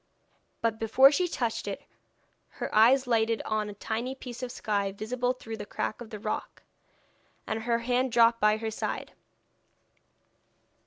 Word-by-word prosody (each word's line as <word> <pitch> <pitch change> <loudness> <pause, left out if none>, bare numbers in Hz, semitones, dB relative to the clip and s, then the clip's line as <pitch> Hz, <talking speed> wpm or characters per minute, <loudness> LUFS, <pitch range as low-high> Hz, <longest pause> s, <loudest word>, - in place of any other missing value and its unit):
But 225 -1 0
before 260 +5 +6
she 355 +4 +1
touched 235 -9 -2
it - - -5 0.7
her - - -4
eyes 250 +5 +6
lighted 230 -2 +2
on 215 -1 -1
a 205 - -8
tiny 235 +5 -3
piece 250 -2 -8
of 250 -1 -4
sky 200 -4 -1
visible 245 +5 -1
through 225 -3 -7
a - - -5
crack 215 - -3
of 230 - -8
the 215 - -6
rock, 215 +1 -5 0.8
and 220 0 -3
her 235 0 +1
hand 250 +2 0
dropped 230 0 +5
by 210 0 +4
her 220 0 -3
side. - - -4
230 Hz, 155 wpm, -28 LUFS, 220-250 Hz, 0.8 s, before